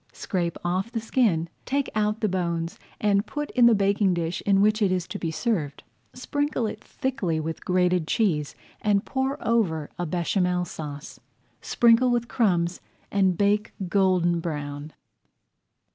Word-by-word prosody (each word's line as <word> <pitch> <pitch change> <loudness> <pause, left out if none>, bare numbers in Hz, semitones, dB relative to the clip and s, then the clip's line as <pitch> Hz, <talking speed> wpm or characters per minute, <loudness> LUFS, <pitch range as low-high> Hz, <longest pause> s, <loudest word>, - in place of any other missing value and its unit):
Scrape 175 -4 -2
off 185 +6 -1
the 230 - -2
skin, 220 -8 +1 0.2
take 280 +1 -1
out 210 +1 0
the 215 - +2
bones, 170 -3 -2 0.2
and 205 0 +2
put 295 0 -4
in 245 -2 +5
the 235 - +6
baking 200 -1 +2
dish 170 0 -2
in 195 -1 +4
which 215 +2 +3
it 200 -3 +3
is 180 -1 -1
to - - -6
be 165 - -2
served. 160 - -2 0.3
Sprinkle 285 0 -1
it 215 0 -5
thickly 205 -12 -2
with 160 +1 -5
grated 180 -2 +1
cheese 160 -10 0 0.3
and 205 -1 +2
pour 265 +1 -1
over 175 -10 +1
a 175 - -1
Béchamel 180 +1 0
Sauce. 150 -3 -8 0.4
Sprinkle 235 +1 +4
with 240 -1 0
crumbs 175 -8 +1 0.3
and 190 -3 +2
bake 205 +1 +1 0.2
golden 180 -2 +2
brown. 145 -2 -5
190 Hz, 150 wpm, -25 LUFS, 170-220 Hz, 0.4 s, the